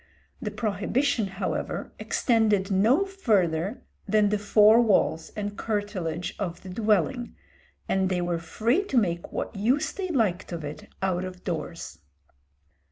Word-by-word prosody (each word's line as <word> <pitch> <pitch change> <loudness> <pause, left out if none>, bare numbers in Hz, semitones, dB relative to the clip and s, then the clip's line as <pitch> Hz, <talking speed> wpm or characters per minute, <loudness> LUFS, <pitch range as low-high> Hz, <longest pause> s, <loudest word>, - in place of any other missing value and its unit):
The 210 - -2
prohibition, 215 +2 0
however, 190 0 -3
extended 215 -5 +2
no 230 - +4
farther 205 - 0 0.2
than 210 -1 +3
the 210 0 0
four 210 +2 +6
walls 200 -7 +2
and 205 -1 -4
curtilage 195 -7 -3
of 180 -4 -4
the 190 - -8
dwelling, 220 +5 0 0.5
and 190 -1 +1
they 185 -1 0
were 175 -1 -1
free 235 - 0
to 275 - -1
make 170 -6 0
what - - -4
use 240 +8 +1
they 385 -1 -4
liked 210 - 0
of 170 -2 -4
it 145 +1 -7 0.2
out 185 -1 0
of 185 0 -8
doors. 165 - -5
205 Hz, 140 wpm, -26 LUFS, 180-225 Hz, 0.5 s, four